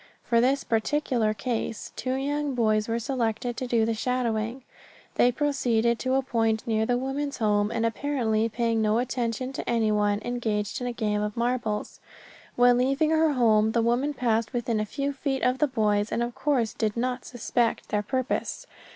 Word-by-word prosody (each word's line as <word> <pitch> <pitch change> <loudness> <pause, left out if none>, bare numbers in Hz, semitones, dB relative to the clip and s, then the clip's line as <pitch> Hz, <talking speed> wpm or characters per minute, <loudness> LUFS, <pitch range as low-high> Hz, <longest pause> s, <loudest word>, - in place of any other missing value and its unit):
For 235 -1 +2
this 270 +3 +2
particular 230 -1 0
case 225 0 -3
two 255 0 -2
young 285 +1 -1
boys 215 -2 +2
were 230 0 0
selected 235 -1 -2
to 255 - -4
do 230 -2 +2
the 230 - 0
shadowing. 235 +1 -1 0.5
They 245 - +4
proceeded 240 -5 +1
to 260 0 0
a 270 - +2
point 225 -3 0
near 220 -1 0
the 245 - +2
woman's 275 +3 -3
home, 210 -2 +2
and 230 0 -1
apparently 230 -3 0
paying 230 0 0
no 215 0 +2
attention 250 +1 -2
to - - -5
anyone, 210 -3 +2
engaged 225 -3 -2
in 245 - -2
a - - -1
game 210 -3 -1
of 210 +1 -3
marbles. 235 -3 -2 0.6
When 245 0 +5
leaving 275 +5 +2
her 320 -1 +3
home 220 -3 +3
the 230 - +2
woman 255 +5 +1
passed 230 -3 0
within 240 -2 -1
a 215 - 0
few 280 +4 -2
feet 270 -1 -2
of 250 +1 +2
the 300 - +3
boys 210 -5 +1
and 235 - 0
of 240 0 -3
course 255 -7 0
did 215 0 -2
not 250 +1 -1
suspect 240 -1 -1
their 210 - +1
purpose. 255 +5 -2
235 Hz, 180 wpm, -26 LUFS, 220-255 Hz, 0.6 s, When